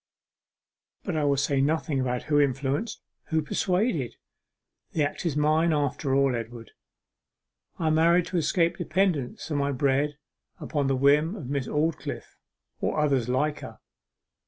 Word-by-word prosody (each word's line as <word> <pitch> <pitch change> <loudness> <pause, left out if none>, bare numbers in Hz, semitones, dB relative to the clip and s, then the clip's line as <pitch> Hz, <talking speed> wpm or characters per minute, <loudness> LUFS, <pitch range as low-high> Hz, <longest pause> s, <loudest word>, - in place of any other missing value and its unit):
'But 185 - -3
I 150 -2 +1
will 140 -1 +2
say 140 0 +1
nothing 150 -1 0
about 125 -1 -1
who 145 -1 +2
influenced 140 - -1 0.2
who 160 -1 0
persuaded. 180 - 0 0.8
The 155 - +1
act 145 +4 -2
is 150 -3 -1
mine, 155 +3 +3
after 145 -1 0
all. 135 -2 +3
Edward, 115 0 -7 1.1
I 160 -2 +1
married 170 +2 +4
to 180 - -1
escape 170 +2 +1
dependence 175 -6 -1
for 155 - -3
my 140 0 +1
bread 140 +2 +1 0.4
upon 145 -3 -1
the 135 - +2
whim 145 +7 +3
of 140 - -7
Miss 140 -3 -1
Aldclyffe, 155 +2 -2 0.4
or - - -1
others 135 -5 +1
like 145 +4 0
her. - - -9
145 Hz, 145 wpm, -26 LUFS, 135-160 Hz, 1.1 s, married